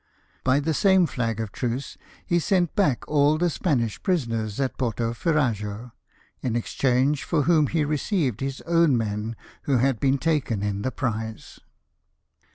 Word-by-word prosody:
By 130 +2 +3
the 160 +2 0
same 190 +2 +4
flag 115 -6 -2
of 110 -3 -3
truce 125 +4 -3 0.3
he 175 - +2
sent 175 -1 +1
back 165 - +1
all 150 +1 +3
the 175 +1 +1
Spanish 120 - -1
prisoners 115 - -1
at 135 -2 -1
Porto 115 -2 -1
Ferrajo, 120 - -1 0.5
in 120 -3 -1
exchange 130 +4 +1
for 155 -4 +1
whom 160 -3 +4
he 155 0 0
received 150 - -1
his 135 0 -4
own 165 -6 +3
men 110 0 -3 0.3
who 135 -3 +2
had 130 -1 +1
^been 135 0 +2
taken 140 -10 0
in 100 -1 -2
the 130 - -1
prize. 110 -4 -4
135 Hz, 155 wpm, -25 LUFS, 115-155 Hz, 0.5 s, same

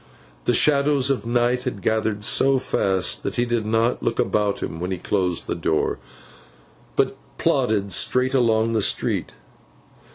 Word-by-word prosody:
The - - +2
shadows 140 -2 +3
of 125 -3 -2
night 120 +1 +1
had 105 -7 -4
gathered 110 -1 0
so 135 +4 +3
fast, 95 -7 -1
that - - -4
he 120 - +1
did 120 -3 -2
not 115 +2 +1
look 115 - -1
about 105 -1 0
him 80 - -5
when 90 +1 -3
he 95 - -2
closed 90 -1 -1
the - - -2
door, 80 - -1 1.0
but - - +1 0.2
plodded 100 -3 0
straight 130 +7 +2
along 115 -3 +2
the 110 -1 +1
street. - - -1
115 Hz, 155 wpm, -22 LUFS, 100-125 Hz, 1.0 s, shadows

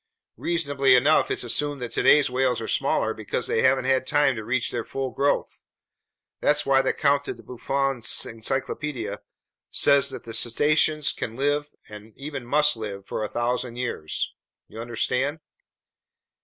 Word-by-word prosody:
Reasonably 140 -6 +2
enough, 145 +5 +3
it's - - -1
assumed 145 +4 -1
that 120 - -5
today's 145 +4 +4
whales 125 0 0
are 110 - -5
smaller - - 0
because - - -3
they 110 - 0
haven't 130 0 +3
had 130 0 +1
time 145 -3 +2
to 110 - -6
reach 120 +3 -1
their 120 - -3
full 135 +1 -4
growth. 140 +1 -1 0.8
That's 150 0 +2
why 135 -1 +4
the 130 - +1
Count 140 -1 +1
de - - -4
Buffon's 125 +1 -1
encyclopedia 115 -1 -4 0.5
says 140 0 +4
that 135 - -6
cetaceans 150 +5 +2
can 115 - -5
live, 145 +2 -1
and 105 +1 -12
even 135 -3 -7
must 150 +2 +3
live, 100 -3 -7
for - - -4
a 105 - -1
thousand 120 0 -2
years. 120 -11 -2 0.3
You 110 - -9
understand?" 125 +5 -1
130 Hz, 150 wpm, -24 LUFS, 120-145 Hz, 0.8 s, today's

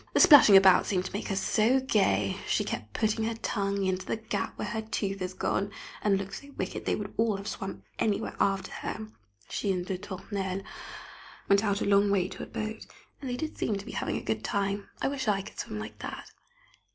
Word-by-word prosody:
The - - +5
splashing 285 - +10
about 190 -1 +6
seemed 185 -2 0
to - - -6
make 205 - -3
her 195 - -1
so 220 +6 +3
gay, 150 - +2
she - - +2
kept 105 -1 -5
putting 220 0 +1
her 230 0 -1
tongue 200 -3 -1
into 185 0 0
the - - -2
gap 220 0 -3
where - - -3
her 220 - -2
tooth 200 -3 -3
is 185 0 -3
gone, 200 +1 -1 0.3
and 200 -2 +3
looked 195 +1 -5
so 280 - -12
wicked 190 - -4
they - - +2
would 205 -1 -5
all 225 -3 +2
have 200 +1 -7
swam 195 -2 -5 0.2
anywhere 210 -2 0
after 195 -1 +1
her. 110 - -5 0.4
She 200 - -1
and 180 -1 -1
de 185 -1 -3
Tournelle 195 -1 -4 0.8
went 200 +1 +4
out 200 -2 +1
a - - +1
long 200 0 +4
way 190 -2 +2
to - - -8
a - - -5
boat, 215 0 -5 0.3
and 270 - -4
they 245 - -2
did 310 +4 -5
seem 215 - 0
to 200 - -8
be - - -7
having - - -2
a - - -4
good 110 -1 -2
time. 200 0 -1
I - - +3
wish 270 -2 -2
I 200 -2 +2
could 210 - -11
swim 105 - -4
like 105 0 -7
that. - - -7
200 Hz, 225 wpm, -29 LUFS, 190-220 Hz, 0.8 s, splashing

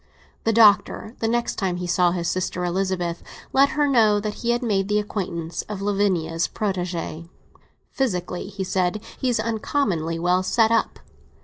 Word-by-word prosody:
The 225 - +3
Doctor, 215 +1 +4
the 225 - 0
next 235 +1 -1
time 185 -4 -1
he 180 - -4
saw 175 0 +3
his 175 -1 -2
sister 180 -1 -1
Elizabeth, 180 -1 -1 0.3
let 275 +1 +5
her 295 -1 +3
know 220 -6 +4
that 210 0 -3
he 235 - -2
had 240 +1 +1
made 195 -4 +1
the 210 0 +1
acquaintance 175 -5 -3
of 210 -2 -4
Lavinia's 195 -5 0
protégé. 175 -4 -3 0.6
"Physically," 180 -8 -2
he 195 -1 -5
said, 185 +1 0 0.2
"he's 245 -3 +1
uncommonly 215 - -1
well 180 +2 +2
set 220 +4 +2
up. 230 - +1
195 Hz, 155 wpm, -23 LUFS, 180-220 Hz, 0.6 s, let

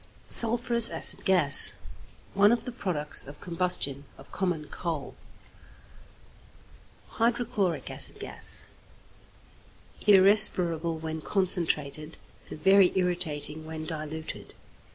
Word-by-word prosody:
=Sulphurous 235 0 +7
Acid - - 0
Gas.= 175 -7 +5 0.6
One 205 +2 +3
of 235 -1 -2
the 250 - -7
products 175 - -2
of 145 +2 -14
combustion 170 -6 -1
of 135 - -18
common 175 -5 -4
coal. 165 -5 -7 2.0
=Hydrochloric 225 - -3
Acid - - -5
Gas.= - - 0 1.4
Irrespirable 180 -5 +3
when 160 0 -7
concentrated, 160 -5 -3 0.3
and - - -10
very 195 0 +4
irritating 160 -4 -4
when 155 0 -9
diluted. 155 0 -9
175 Hz, 90 wpm, -25 LUFS, 155-195 Hz, 2.0 s, =Sulphurous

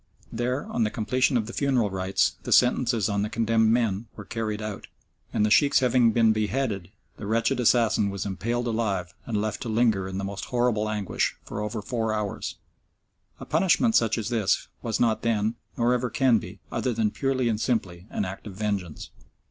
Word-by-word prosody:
There, 125 +4 -1
on 120 - -1
the 110 - +1
completion 125 +4 +1
of 110 - -1
the 120 - -8
funeral 130 -7 +1
rites, 95 0 +1
the - - -6
sentences 120 -3 +3
on 100 -1 0
the 105 - -1
condemned 115 0 +2
men 115 -2 +1
were 105 - -9
carried 110 -1 -3
out, 105 -2 -6 0.4
and 105 - +2
the 105 - 0
Sheikhs 140 +5 +5
having 125 -2 +4
been 115 -1 +4
beheaded 110 -3 -1 0.3
the 105 - -6
wretched 115 +4 +1
assassin 115 -3 +3
was 100 -1 -4
impaled 115 +5 -2
alive 100 -6 -1
and 110 -3 -1
left 105 0 -2
to 120 - -4
linger 110 -4 +2
in 95 0 -5
the 100 - -3
most 100 0 -5
horrible 120 -3 0
anguish 105 -3 -1
for 105 - -5
over 105 0 -4
four 110 -2 -1
hours. 105 -2 -3 0.8
A - - -8
punishment 190 - +2
such 115 0 +3
as 110 -1 -3
this 110 -5 0
was 110 -2 -2
not 115 -2 +2
then, 110 -1 +1 0.2
nor 120 +1 +3
ever 125 0 0
can 120 -1 +3
be, - - -10
other 125 - -1
than 110 -1 +1
purely 130 -1 0
and 110 -1 0
simply 95 -7 -2
an 105 - -2
act 95 +3 -7
of 100 - -8
vengeance. 100 -6 -3
110 Hz, 195 wpm, -26 LUFS, 105-120 Hz, 0.8 s, Sheikhs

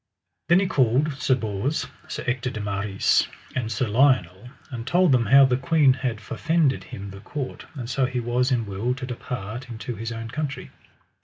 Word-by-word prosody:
Then 175 +2 +6
he 195 - +2
called 140 -2 +2
Sir 130 - +3
Bors, 110 +5 -2 0.2
Sir - - -5
Ector 125 +1 -1
de 110 - -6
Maris, 100 -1 +1 0.3
and 115 -4 -2
Sir 120 +2 0
Lionel, 115 -4 +2 0.2
and 120 -1 -6
told 180 +2 +4
them 120 -4 +3
how 135 +3 +8
the 125 -1 +2
queen 150 -2 +4
had 130 -4 -3
forfended 155 +6 0
him 100 0 -8
the 100 - -10
court, 130 +5 -6
and 125 -4 -5
so 130 +1 +1
he 130 -1 -2
was 120 +2 0
in 120 -3 +1
will 105 +5 -2
to 130 - -6
depart 120 -1 -6
into 115 +1 -5
his 115 +2 -5
own 115 0 -5
country. 150 -2 -4
125 Hz, 185 wpm, -24 LUFS, 110-135 Hz, 0.3 s, how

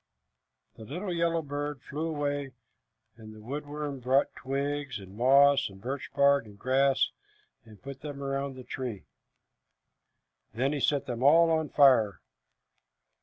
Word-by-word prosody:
The 110 - -10
little 175 - -5
yellow 170 -1 0
bird 145 -1 -5
flew 155 +3 -4
away, 145 -3 -3 0.6
and 110 -1 -12
the - - -13
wood 140 +7 -6
worm 145 -2 -5
brought 130 +3 +1
twigs, 140 -1 -3
and 95 0 -12
moss, 135 +3 +5
and 95 0 -14
birch 130 +6 -5
bark, 140 -2 +4
and 100 -1 -14
grass, 135 +3 +2 0.5
and 110 -3 -15
put 135 -1 -9
them 140 -2 -7
around 135 0 -3
the 130 - -10
tree. 120 -7 -5 1.5
Then 135 +5 0
he 145 - -2
set 140 0 +1
them 120 -2 -5
all 165 +5 +6
on 160 -2 0
fire. 130 -8 +4
140 Hz, 145 wpm, -29 LUFS, 125-145 Hz, 1.5 s, all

